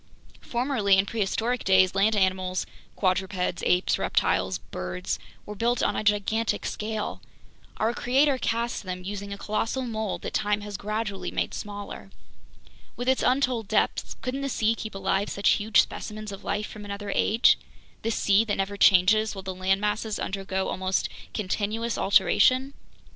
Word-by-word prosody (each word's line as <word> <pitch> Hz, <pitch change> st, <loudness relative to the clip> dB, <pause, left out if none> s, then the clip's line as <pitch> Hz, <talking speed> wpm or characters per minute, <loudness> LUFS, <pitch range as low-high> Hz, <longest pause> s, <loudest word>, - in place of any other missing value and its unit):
Formerly, 235 Hz, -6 st, +2 dB
in 190 Hz, -, +3 dB
prehistoric 225 Hz, +3 st, -1 dB
days, 190 Hz, -1 st, +4 dB
land 205 Hz, +3 st, +3 dB
animals 185 Hz, -1 st, +1 dB, 0.3 s
(quadrupeds, 185 Hz, -2 st, 0 dB
apes, 180 Hz, 0 st, +2 dB
reptiles, 95 Hz, -1 st, +1 dB
birds) 95 Hz, -, -5 dB, 0.3 s
were 210 Hz, -, -6 dB
built 235 Hz, +4 st, 0 dB
on -, -, +1 dB
a -, -, -1 dB
gigantic 210 Hz, +2 st, +1 dB
scale. 215 Hz, 0 st, -3 dB, 0.6 s
Our 225 Hz, +2 st, +1 dB
Creator 265 Hz, +3 st, +2 dB
cast 235 Hz, 0 st, -1 dB
them 185 Hz, -2 st, -6 dB
using 200 Hz, +1 st, -5 dB
a 200 Hz, -, -5 dB
colossal 225 Hz, +6 st, -2 dB
mold 220 Hz, -4 st, -3 dB
that -, -, -5 dB
time 210 Hz, 0 st, +1 dB
has 205 Hz, -1 st, -6 dB
gradually 210 Hz, 0 st, -3 dB
made -, -, -2 dB
smaller. 205 Hz, -1 st, -7 dB, 0.9 s
With 245 Hz, -, -5 dB
its 260 Hz, 0 st, +3 dB
untold 250 Hz, -4 st, +1 dB
depths, -, -, 0 dB
couldn't 265 Hz, +2 st, -2 dB
the 275 Hz, -, -2 dB
sea 225 Hz, -3 st, +2 dB
keep 220 Hz, -2 st, -7 dB
alive 195 Hz, +1 st, 0 dB
such 200 Hz, -, +1 dB
huge 215 Hz, +1 st, +4 dB
specimens 215 Hz, 0 st, -7 dB
of 195 Hz, -, -9 dB
life 210 Hz, +1 st, -1 dB
from 210 Hz, 0 st, -9 dB
another 200 Hz, 0 st, -5 dB
age, 225 Hz, +3 st, +4 dB, 0.4 s
this 225 Hz, 0 st, -1 dB
sea 200 Hz, +2 st, +4 dB
that 205 Hz, -, -1 dB
never 195 Hz, +1 st, -2 dB
changes 205 Hz, +3 st, +5 dB
while 195 Hz, -, -7 dB
the 190 Hz, 0 st, -4 dB
land 190 Hz, +1 st, +1 dB
masses 210 Hz, +1 st, -1 dB
undergo 190 Hz, -1 st, -2 dB
almost 185 Hz, 0 st, -1 dB, 0.2 s
continuous 215 Hz, +3 st, -2 dB
alteration? 255 Hz, +7 st, +4 dB
205 Hz, 155 wpm, -26 LUFS, 195-225 Hz, 0.9 s, changes